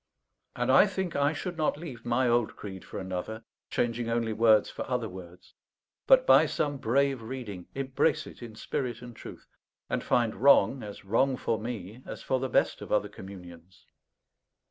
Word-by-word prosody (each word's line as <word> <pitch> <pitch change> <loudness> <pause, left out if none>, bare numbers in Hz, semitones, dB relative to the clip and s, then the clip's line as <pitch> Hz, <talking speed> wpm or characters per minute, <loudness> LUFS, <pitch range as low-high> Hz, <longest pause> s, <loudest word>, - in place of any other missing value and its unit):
And 120 +1 +1
I 135 +10 +7
think 190 -3 -3
I 145 +1 +3
should 175 +2 -5
not 155 -2 +1
leave 135 -8 -9
my 120 +2 +2
old 120 -2 +1
creed 95 -3 -8
for - - -8
another, 95 +4 -5 0.3
changing 120 -1 -1
only 115 -1 0
words 110 -1 +5
for - - -8
other 125 -3 -1
words; 90 -2 -12 0.5
but - - +6
by - - +6
some 145 -1 -1
brave 135 +1 +1
reading, 110 -6 -7
embrace 135 +3 +1
it - - -12
in 115 -2 -9
spirit 125 +2 -4
and 120 -1 -10
truth, - - -11 0.5
and - - -1
find 115 -3 +2
wrong 135 0 +5
as 100 -1 -9
wrong 125 +6 +2
for 115 -2 -1
me 110 -1 -6
as - - -7
for 130 - 0
the 130 0 -2
best - - +1
of - - -8
other 105 -1 +2
communions. 90 -3 -12
120 Hz, 175 wpm, -29 LUFS, 105-135 Hz, 0.5 s, I